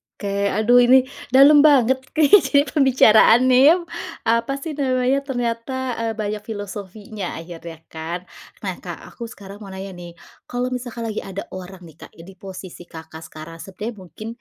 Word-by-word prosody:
Oke, 200 0 -2
aduh 230 +4 +4
ini 250 +1 +6 0.3
dalem 285 +2 +8
banget 265 -4 +4 0.2
kayaknya 290 -3 +5
pembicaraannya 255 -2 +5
ya, 320 - +8 0.5
apa 230 +3 +1
sih 320 - -4
namanya, 260 0 +1
ternyata, 240 -1 -3 0.3
eee, 225 -1 -2
banyak 210 -1 -3
filosofinya, 205 -1 -7
akhirnya 165 -1 -10
kan. 165 +3 -6 0.4
Nah, - - -4
Kak, - - -7 0.2
aku 235 - -8
sekarang 200 -2 -12
mau 210 - -10
nanya 190 0 -8
nih, 175 -2 -11 0.3
kalau 245 +1 -3
misalkan 245 -2 -5
lagi 215 - -4
ada 195 +1 -7
orang 185 0 -9
nih, 160 -4 -14
Kak, - - -13
e 165 - -13
di 185 - -12
posisi 185 -2 -10
Kakak 160 -1 -11
sekarang, 160 +2 -11
sebenarnya 200 +6 -7
mungkin 190 +4 -10
215 Hz, 160 wpm, -21 LUFS, 185-250 Hz, 0.5 s, dalem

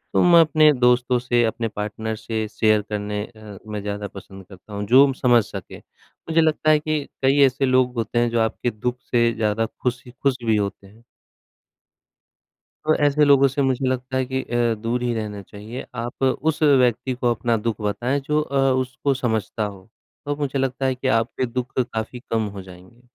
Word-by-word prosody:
तो - - +5
मैं 175 -1 +7
अपने 155 -1 +5
दोस्तों 125 -1 +3
से, 120 -1 +1
अपने 115 +1 -1
पार्टनर 110 +1 -4
से 110 0 -4
शेयर 110 -1 +2
करने 105 0 -3
अ, 110 -3 -12
में 105 -1 -4
ज़्यादा 105 0 -4
पसंद 95 -1 -12
करता 95 +2 -14
हूँ 100 0 -3
जो 135 +4 +6
समझ 120 -4 +3
सके। - - -9
मुझे 165 0 -4
लगता 155 -1 +1
है 150 - +4
कि 155 -1 -2 0.2
कई 135 +2 +3
ऐसे 135 +1 +1
लोग 130 -1 +2
होते 115 +1 -1
हैं 120 0 +2
जो 115 0 0
आपके 115 +2 -1
दुःख 125 +3 -3
से 115 -1 +3
ज़्यादा 110 0 0 0.2
खुशी 125 0 -3
खुश 135 -2 +1
भी 110 -2 +2
होते 100 -1 -3
हैं। 110 +4 -20 1.8
तो 155 - +3
ऐसे 145 +1 +4
लोगों 140 -1 +5
से 140 +2 -1
मुझे 130 0 0
लगता 130 0 -2
है 130 - +1
कि 130 +1 -2
अ, 120 -2 0
दूर 115 +3 -3
ही 120 -1 0
रहना 105 -2 -5
चाहिए। 105 +5 -9
आप 120 +2 -6
उस 145 +4 0
व्यक्ति 130 -3 +3
को 125 -1 0
अपना 115 0 0
दुःख 110 0 -3
बताएँ 120 +7 -1
जो 150 +2 0
अ, 140 -2 -4 0.2
उसको 130 +2 -1
समझता 110 -4 -2
हो, 100 -1 -8 0.4
तो 145 0 -1
मुझे 145 -2 -2
लगता 135 0 -1
है 130 - +1
कि 130 +1 -3
आपके 125 +2 -3
दुःख 125 +2 -5
काफ़ी 120 0 -4
कम 110 -2 0
हो 95 - -6
जाएँगे। 95 +5 -15
120 Hz, 190 wpm, -22 LUFS, 110-135 Hz, 1.8 s, मैं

